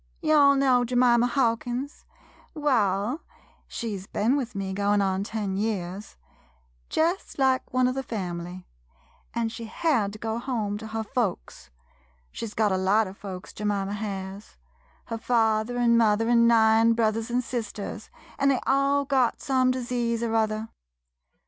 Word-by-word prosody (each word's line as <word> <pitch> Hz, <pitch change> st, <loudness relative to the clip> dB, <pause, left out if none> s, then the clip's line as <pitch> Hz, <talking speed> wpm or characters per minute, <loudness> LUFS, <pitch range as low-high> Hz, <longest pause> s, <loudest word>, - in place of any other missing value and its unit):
Ye 315 Hz, -3 st, -1 dB
all 285 Hz, -2 st, +6 dB
know 260 Hz, -3 st, +3 dB
Jemima 245 Hz, 0 st, +3 dB
Hawkins 245 Hz, +2 st, -1 dB, 0.2 s
— -, -, -29 dB
waal, 240 Hz, -, +1 dB, 0.5 s
she 225 Hz, -3 st, -4 dB
's 190 Hz, 0 st, -9 dB
ben 230 Hz, +6 st, +1 dB
with 250 Hz, -6 st, -3 dB
me 195 Hz, -1 st, -3 dB
goin' 205 Hz, +1 st, +1 dB
on 195 Hz, -1 st, 0 dB
ten 205 Hz, -3 st, -3 dB
years 200 Hz, -, -3 dB, 0.3 s
— -, -, -38 dB
jest 340 Hz, +4 st, -1 dB
like 265 Hz, -2 st, +1 dB
one 255 Hz, 0 st, +3 dB
of 255 Hz, -, 0 dB
the 270 Hz, -, -2 dB
family, 180 Hz, -6 st, -5 dB, 0.7 s
an' 230 Hz, -1 st, 0 dB
she 230 Hz, 0 st, -7 dB
had 225 Hz, -4 st, 0 dB
to -, -, -8 dB
go 225 Hz, +1 st, -3 dB
home 220 Hz, -5 st, -2 dB
to 220 Hz, -, -8 dB
her 220 Hz, 0 st, -3 dB
folks 220 Hz, -, -3 dB, 0.3 s
— 65 Hz, -1 st, -37 dB
she 230 Hz, -, -5 dB
's 210 Hz, -, -11 dB
got 215 Hz, -2 st, +2 dB
a 190 Hz, -, +1 dB
lot 200 Hz, +4 st, +3 dB
of 190 Hz, 0 st, -9 dB
folks, 190 Hz, -3 st, -8 dB
Je 210 Hz, -, -8 dB
mima 200 Hz, -1 st, -1 dB
has 200 Hz, -1 st, -6 dB, 0.2 s
— -, -, -35 dB
her 230 Hz, -1 st, -3 dB
father 225 Hz, 0 st, +1 dB
an' 235 Hz, -1 st, +4 dB
mother 225 Hz, 0 st, +3 dB
an' 235 Hz, -1 st, +5 dB
nine 225 Hz, 0 st, +5 dB
brothers 225 Hz, 0 st, 0 dB
an' 245 Hz, +1 st, 0 dB
sisters, 225 Hz, -4 st, -5 dB, 0.3 s
an' 275 Hz, -, +3 dB
they 265 Hz, -3 st, +2 dB
all 275 Hz, +1 st, +2 dB
got 260 Hz, -4 st, +1 dB
some 260 Hz, -2 st, +2 dB
dis 255 Hz, -1 st, -2 dB
ease 235 Hz, -1 st, 0 dB
or 225 Hz, -1 st, -1 dB
other. 220 Hz, 0 st, 0 dB
225 Hz, 175 wpm, -26 LUFS, 205-250 Hz, 0.7 s, all